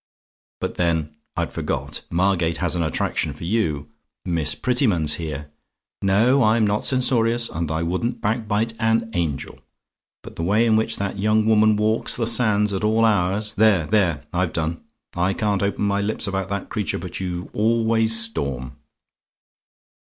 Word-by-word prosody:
But -, -, -4 dB
then, 80 Hz, -3 st, 0 dB, 0.2 s
I'd -, -, -2 dB
forgot; -, -, -3 dB
Margate 85 Hz, -2 st, +1 dB
has 90 Hz, -1 st, 0 dB
an 85 Hz, -, 0 dB
attraction 80 Hz, -, -1 dB
for -, -, -11 dB
you 80 Hz, -7 st, -1 dB, 0.3 s
Miss 80 Hz, -4 st, +1 dB
Prettyman's 105 Hz, -, +1 dB
here. 75 Hz, -2 st, -6 dB, 0.5 s
No; 110 Hz, +8 st, +3 dB
I'm 110 Hz, -1 st, +3 dB
not 105 Hz, +1 st, 0 dB
censorious, 120 Hz, -3 st, +2 dB
and 80 Hz, 0 st, -3 dB
I 80 Hz, +1 st, -1 dB
wouldn't 95 Hz, +8 st, -2 dB
backbite 110 Hz, +1 st, -1 dB
an 115 Hz, 0 st, +1 dB
angel; 80 Hz, -7 st, -3 dB, 0.6 s
but -, -, -11 dB
the -, -, -3 dB
way 105 Hz, +6 st, +3 dB
in 110 Hz, -2 st, +3 dB
which 110 Hz, +1 st, 0 dB
that 100 Hz, 0 st, -3 dB
young 105 Hz, +1 st, +2 dB
woman 110 Hz, -1 st, +4 dB
walks 110 Hz, +2 st, +1 dB
the 120 Hz, -, -1 dB
sands 110 Hz, -3 st, +2 dB
at 95 Hz, -, -2 dB
all 110 Hz, +1 st, +3 dB
hours 105 Hz, +1 st, +1 dB
there! 100 Hz, -6 st, +3 dB
there! 85 Hz, -7 st, +1 dB
I've 90 Hz, -1 st, 0 dB
done: 85 Hz, 0 st, -2 dB, 0.3 s
I 90 Hz, +2 st, 0 dB
can't 105 Hz, -4 st, 0 dB
open 100 Hz, +1 st, -1 dB
my 100 Hz, 0 st, +1 dB
lips 105 Hz, +2 st, -2 dB
about 95 Hz, -1 st, -3 dB
that 100 Hz, 0 st, -4 dB
creature 105 Hz, -6 st, -2 dB
but 90 Hz, +1 st, -6 dB
you 90 Hz, -1 st, -5 dB
always 115 Hz, 0 st, +2 dB
storm. 70 Hz, -, -1 dB
100 Hz, 160 wpm, -22 LUFS, 85-110 Hz, 0.6 s, woman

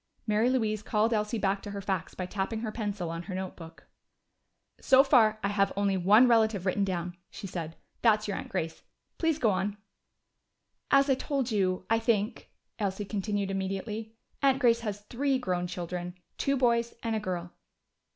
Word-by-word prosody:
Mary 215 Hz, +2 st, +2 dB
Louise 220 Hz, -5 st, 0 dB
called 215 Hz, +2 st, +1 dB
Elsie 210 Hz, +1 st, 0 dB
back 195 Hz, -1 st, 0 dB
to -, -, -7 dB
her 200 Hz, 0 st, -5 dB
facts 190 Hz, -3 st, -3 dB
by 185 Hz, -, -3 dB
tapping 200 Hz, +4 st, -3 dB
her 220 Hz, -2 st, -3 dB
pencil 205 Hz, -6 st, -3 dB
on 165 Hz, 0 st, -4 dB
her 185 Hz, +1 st, -6 dB
notebook. 175 Hz, -3 st, -7 dB, 0.9 s
"So 265 Hz, 0 st, +6 dB
far 230 Hz, -6 st, +4 dB
I 200 Hz, -, +1 dB
have 200 Hz, -1 st, +2 dB
only 200 Hz, -1 st, +2 dB
one 205 Hz, +7 st, +6 dB
relative 220 Hz, -5 st, +3 dB
written 200 Hz, +2 st, +1 dB
down," 175 Hz, -2 st, -2 dB
she -, -, -9 dB
said. 165 Hz, -4 st, -5 dB, 0.3 s
"That's 215 Hz, -2 st, +3 dB
your 200 Hz, -, -2 dB
aunt -, -, -6 dB
Grace. 165 Hz, -4 st, -3 dB, 0.4 s
Please 325 Hz, -3 st, +2 dB
go 230 Hz, -8 st, +3 dB
on." 200 Hz, +2 st, -1 dB, 1.1 s
"As 275 Hz, 0 st, +5 dB
I 270 Hz, -, +4 dB
told 265 Hz, -1 st, -2 dB
you, 185 Hz, -3 st, 0 dB
I 225 Hz, 0 st, +3 dB
think," 225 Hz, -1 st, 0 dB, 0.3 s
Elsie 200 Hz, 0 st, -2 dB
continued 200 Hz, -1 st, -2 dB
immediately, 195 Hz, +3 st, -4 dB, 0.3 s
"Aunt 270 Hz, -2 st, +4 dB
Grace 235 Hz, -3 st, +4 dB
has 210 Hz, -3 st, -4 dB
three 265 Hz, +6 st, 0 dB
grown 180 Hz, -7 st, -1 dB
children. 175 Hz, 0 st, -5 dB, 0.2 s
Two 275 Hz, 0 st, +1 dB
boys 235 Hz, -2 st, +2 dB
and 225 Hz, -1 st, 0 dB
a -, -, 0 dB
girl." 180 Hz, -4 st, -4 dB
210 Hz, 175 wpm, -29 LUFS, 190-230 Hz, 1.1 s, So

